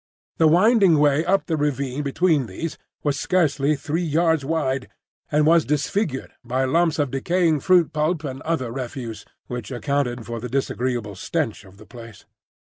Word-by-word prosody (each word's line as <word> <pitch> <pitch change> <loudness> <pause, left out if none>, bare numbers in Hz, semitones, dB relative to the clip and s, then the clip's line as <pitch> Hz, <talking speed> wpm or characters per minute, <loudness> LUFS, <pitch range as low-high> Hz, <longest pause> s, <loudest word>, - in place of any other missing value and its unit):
The 160 - +6
winding 190 +1 +5
way 145 +1 +3
up 195 +3 +1
the 165 - -1
ravine 140 -2 -1
between 145 -1 +1
these 155 - -5 0.3
was 145 -1 0
scarcely 155 -5 +1
three 155 +4 -2
yards 160 -1 +1
wide, 135 -4 -1 0.4
and 150 0 +3
was 165 0 +5
disfigured 150 0 -1
by 130 +2 0
lumps 165 +4 +2
of 145 -4 0
decaying 160 +3 +1
fruit 175 +2 +3
pulp 155 +1 0
and 135 -2 -5
other 145 -7 -2
refuse, 120 -4 -6 0.2
which 125 -4 -6
accounted 125 -2 -2
for 115 -1 -5
the 125 +2 -6
disagreeable 125 -4 -2
stench 95 - -3
of 95 0 -17
the 110 - -14
place. 115 -3 -12
145 Hz, 160 wpm, -23 LUFS, 130-160 Hz, 0.4 s, The